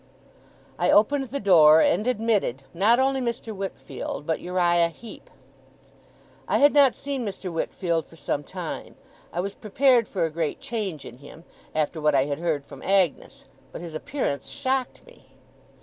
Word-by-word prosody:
I - - +2
opened 270 +7 +4
the 270 +3 -5
door, 160 -6 +7
and 210 +7 +2
admitted, 215 - 0
not 205 +7 +4
only 265 0 +1
Mr. 235 -2 -4
Wickfield, 195 -5 -6
but 160 0 -1
Uriah 175 -1 +2
Heep. 220 +6 -13 1.2
I 205 - +2
had 285 +4 +5
not 280 -3 +5
seen 275 -3 -4
Mr. 195 -4 -5
Wickfield 165 0 -2
for - - -17
some 145 -2 -3
time. - - -7 0.4
I 175 - -2
was 200 +2 -4
prepared 245 +2 +2
for 185 -4 -2
a 165 - 0
great 160 -1 -2
change 215 - -4
in 120 - -11
him, 150 +3 -13 0.3
after 155 +1 -1
what 150 -1 +3
I 135 0 +3
had 145 0 -3
heard 160 -5 -1
from - - -12
Agnes, 190 -6 0 0.3
but - - -8
his 170 -2 -8
appearance 155 - -3
shocked 265 -2 -2
me. - - -20
190 Hz, 165 wpm, -25 LUFS, 160-240 Hz, 1.2 s, door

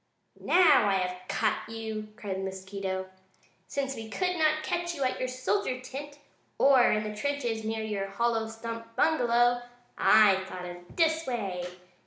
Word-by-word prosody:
"Now 305 - +5
I - - +2
have 180 -1 -3
caught 220 0 -1
you!" 220 -1 -5
cried 200 -3 -4
the - - -4
mosquito. 190 0 -4 0.6
"Since 270 +2 -2
we 225 -1 -7
could 360 +7 -1
not 310 -1 +2
catch 345 +1 -2
you 280 - -2
at 255 - 0
your 255 - -1
soldier 255 +3 -1
tent 285 +3 -8 0.4
or 270 -3 +5
in 215 0 +1
the 215 0 -5
trenches 240 -3 -2
near 220 0 -2
your 205 -2 -2
hollow 225 +2 0
stump 230 0 -7
bungalow, 245 -5 +3 0.4
I 205 -3 +6
thought 180 -1 -7
of 175 0 -10
this 320 -2 +2
way. 195 -8 -3
225 Hz, 160 wpm, -29 LUFS, 200-275 Hz, 0.6 s, I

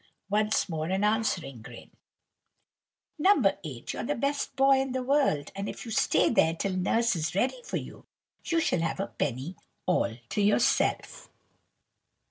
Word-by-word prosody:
Once 210 0 +2
more 160 -3 -3
an 190 +3 0
answering 210 - 0
grin. - - -12 1.3
"No. 380 +3 +5 0.2
8, 135 -7 -6
you're - - -4
the 290 +4 -1
best 280 +2 -2
boy 270 0 +5
in 265 -1 -2
the 260 -1 -2
world; 270 - +1
and 195 +1 -4
if - - -8
you 230 - -7
stay - - +3
there 165 -8 +3
till 190 +2 -2
Nurse 225 +4 +1
is 165 +1 -2
ready 260 - 0
for 480 - -4
you, - - -9 0.4
you 335 -1 +1
shall 180 - +1
have 165 +3 -2
a 195 - 0
penny 135 +6 -3 0.3
all 120 -10 +1
to 210 - -1
yourself." 205 +3 +1
205 Hz, 160 wpm, -28 LUFS, 165-265 Hz, 1.3 s, No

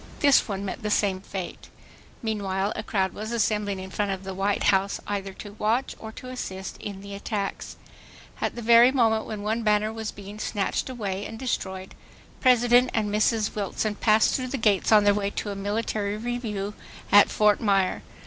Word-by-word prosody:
This 280 -2 +5
one 200 -2 -3
met 195 - -5
the 210 - -2
same 195 -2 +1
fate. 190 -2 -7 0.5
Meanwhile 200 -2 -1
a - - -3
crowd 190 -3 -1
was 220 +2 -6
assembling 210 -3 0
in 190 0 -8
front 205 +1 -1
of 195 -1 -3
the 190 0 -5
White 195 +2 0
House 195 +1 +1
either 200 -1 -3
to 205 +1 -10
watch 230 +5 0
or 220 - -8
to 255 - -9
assist 190 -7 -6
in 200 -2 -7
the 200 0 -9
attacks. 200 0 -4 0.7
At - - -1
the 240 - -6
very 235 +2 +7
moment 225 -4 +2
when 210 -2 -5
one 220 +2 -1
banner 215 0 +2
was 220 -1 -4
being 205 +1 -10
snatched 205 +4 -1
away 205 -6 -3
and 225 - -8
destroyed, 190 -6 -4 0.5
President 245 0 +5
and 210 -2 0
Mrs. 215 0 +1
Wilson 210 +1 -2
passed 215 +1 +3
through 255 -1 -1
the 270 - -3
gates 210 -4 +2
on 210 -1 +7
their 205 0 +5
way 200 -1 -1
to 205 0 -4
a - - -5
military 205 0 -2
review 215 -4 -3 0.4
at 205 0 +7
Fort 210 -1 +3
Myer. 195 -4 +2
210 Hz, 185 wpm, -26 LUFS, 200-225 Hz, 0.7 s, very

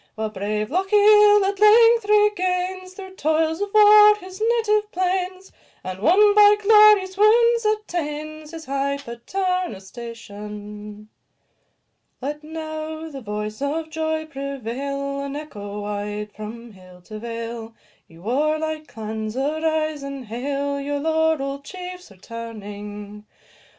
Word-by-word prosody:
While 220 0 -3
brave 210 +2 -3
Lochiel 415 +2 +5
at 395 0 -2
length 455 +2 +6
regains, 370 -3 +1
Through 380 -1 -10
toils 315 +3 0
of 405 0 -2
war, 420 0 +7
his 375 -1 -11 0.2
native 425 -2 +1
plains, 370 +1 -2 0.3
And, 185 0 -6
won 405 - +5
by 415 0 +7
glorious 420 -2 +6
wounds, 465 +2 +4
attains 310 -7 -3
His 325 0 -9
high 275 +1 -1
paternal 365 - -3
station. 210 -1 -10 1.1
Let 295 +3 -5
now 315 0 -6
the 275 -2 -8
voice 210 +1 -5
of 315 +3 -3
joy 315 0 -2
prevail, 275 0 -5
And 280 0 -5
echo 210 -9 -7
wide 205 0 -4
from 230 +3 -9
hill 185 -2 -16
to 215 +3 -9
vale; 230 0 -6 0.3
Ye 165 - -18
warlike 305 - -1
clans, 220 +1 -6
arise 310 +1 -1
and 275 -2 -7
hail 280 +5 -3
Your 285 +1 -3
laurell'd 315 -3 0
chiefs 360 +1 -9
returning. 210 0 -9
300 Hz, 120 wpm, -22 LUFS, 225-370 Hz, 1.1 s, war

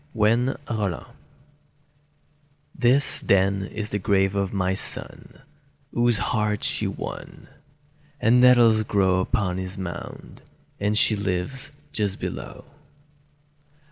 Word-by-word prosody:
THE 110 0 +3 0.3
NETTLES 105 -7 -3 1.7
THIS, 130 +3 +3
then, 95 0 +2
is 105 +2 -6
the 105 - -1
grave 95 -1 +1
of 100 -1 -1
my 95 -2 -1
son, 95 - -1 0.5
Whose 120 -1 +3
heart 105 -1 -1
she - - 0
won! - - -8 0.7
And 120 +2 +4
nettles 120 -3 +5
grow 95 -3 +1
Upon 95 -2 -1
his 95 0 -6
mound; 90 -2 -8 0.4
and 105 +1 0
she 110 - +5
lives 100 +8 -3 0.2
just 100 -3 -2
below. - - -7
105 Hz, 110 wpm, -24 LUFS, 95-115 Hz, 1.7 s, nettles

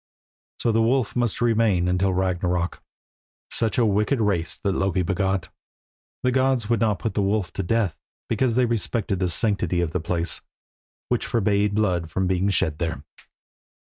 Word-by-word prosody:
So 115 - +1
the 115 +1 +2
wolf 120 0 +1
must 120 -3 0
remain 110 -6 +2
until 90 +2 +2
Ragnarök. 90 -1 -1 0.7
Such 110 -3 0
a 120 - +4
wicked 105 +5 +1
race 100 -6 0
has 100 - +2
Loki 95 -1 0
begot. 95 -2 -1 0.7
The 125 - +3
gods 130 -3 +1
would 115 - +3
not 105 -3 +2
put 110 - -3
the 105 - 0
wolf 100 -2 0
to - - -2
death 100 -1 0 0.3
because 115 +1 +1
they 125 0 +4
respected 110 -3 -1
the 90 -2 +1
sanctity 90 -2 +1
of 85 -3 0
the 90 - -1
place, 85 +1 -2 0.7
which - - 0
forbade 100 -2 +1
blood 90 -6 0 0.2
being 95 +2 +1
shed 80 -5 0
there. 80 -2 -3
100 Hz, 160 wpm, -24 LUFS, 90-115 Hz, 0.7 s, a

